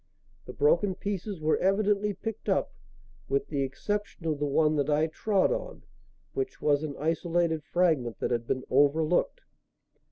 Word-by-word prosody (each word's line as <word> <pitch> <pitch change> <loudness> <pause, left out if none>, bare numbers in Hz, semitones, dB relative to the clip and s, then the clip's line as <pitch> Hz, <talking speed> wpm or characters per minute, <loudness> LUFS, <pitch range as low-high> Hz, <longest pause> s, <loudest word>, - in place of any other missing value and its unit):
The - - -7
broken 430 - +2
pieces 200 -1 -4
were 155 0 +1
evidently 205 +2 +2
picked 225 +2 -6
up, - - +1 0.6
with 415 0 0
the 140 - -1
exception 200 +7 -3
of 155 -3 -1
the 145 - 0
one 155 +2 +2
that 145 0 0
I 150 +1 +3
trod 195 +5 +1
on, - - -4 0.5
which 400 -1 -3
was 145 -1 +2
an 150 -3 -4
isolated 165 +1 0
fragment 155 - +1
that - - -2
had 120 -1 -1
been 130 - -1
overlooked. 155 - +2
165 Hz, 155 wpm, -28 LUFS, 150-205 Hz, 0.6 s, I